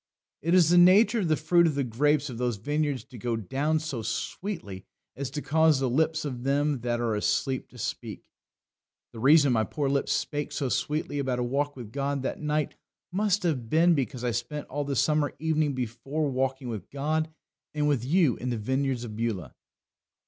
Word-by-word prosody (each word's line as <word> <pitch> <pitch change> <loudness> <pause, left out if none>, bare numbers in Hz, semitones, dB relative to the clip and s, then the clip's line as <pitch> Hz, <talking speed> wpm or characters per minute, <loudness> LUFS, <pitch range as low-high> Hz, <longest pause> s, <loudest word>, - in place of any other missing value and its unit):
It 170 +4 +2
is 170 -3 +6
the 175 - +7
nature 200 +6 +6
of 190 - 0
the 155 - +3
fruit 170 +2 +4
of 155 - -1
the 140 - +1
grapes 145 +5 +1
of 120 -4 -7
those 125 -2 0
vineyards 145 +3 -1
to 125 - -13
go 120 +1 -1
down 135 - 0
so 155 -7 -4
sweetly 115 - -4 0.3
as 140 -1 -4
to 150 +2 -5
cause 160 -2 +3
the 135 - +1
lips 160 +3 +1
of 125 -4 -4
them 140 +1 +1
that 120 0 -1
are 115 -2 0
asleep 105 +5 0
to 125 - -15
speak." 115 - -5 0.9
The 115 - -8
reason 140 +1 +5
my 110 -2 +2
poor 140 +4 -2
lips 140 0 0
spake 145 -1 -2
so 135 -3 -1
sweetly 150 +2 -1
about 130 -3 -1
a 125 - 0
walk 145 +4 -1
with 120 -5 -9
God 140 +1 -2
that - - -3
night 150 0 -1 0.4
most 205 +1 +1
have 135 -10 -1
been 170 +4 +5
because 130 -4 -2
I 120 - +1
spent 120 +6 -4
all 145 +1 -2
the 140 0 -2
summer 150 +1 +1
evening 155 -2 0
before 130 +5 -2
walking 130 0 -1
with 110 -6 -6
God 155 +3 -1 0.5
and 150 0 +1
with 140 -6 +1
you 150 -1 +3
in 125 - -4
the 120 - -1
vineyards 130 +2 -1
of 110 -3 -7
Beulah. 105 - -3
140 Hz, 200 wpm, -27 LUFS, 120-155 Hz, 0.9 s, the